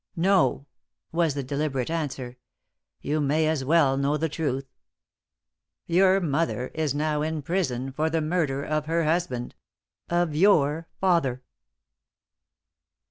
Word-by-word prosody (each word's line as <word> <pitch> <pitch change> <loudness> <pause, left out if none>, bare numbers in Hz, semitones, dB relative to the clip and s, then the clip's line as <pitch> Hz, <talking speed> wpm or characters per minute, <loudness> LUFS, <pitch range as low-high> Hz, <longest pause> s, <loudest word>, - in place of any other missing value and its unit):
"No," 180 -5 +2 0.5
was 165 -3 +1
the 140 - -2
deliberate 140 0 -2
answer. 135 -6 -4 0.6
"You 150 +1 -1
may 155 +2 +2
as 155 -4 0
well 140 -2 +3
know 140 +2 +1
the 160 +1 -1
truth. 140 -3 -2 1.2
Your 185 +2 +4
mother 155 -6 -1
is 155 -3 -1
now 150 0 0
in 155 -1 -2
prison 135 -7 -1
for 155 +4 0
the 165 0 0
murder 155 -4 -1
of 155 0 -2
her 165 +1 +1
husband 155 -6 -1 0.6
of 175 -2 +1
your 160 -2 +3
father!" 160 -9 +1
155 Hz, 125 wpm, -26 LUFS, 140-165 Hz, 1.2 s, Your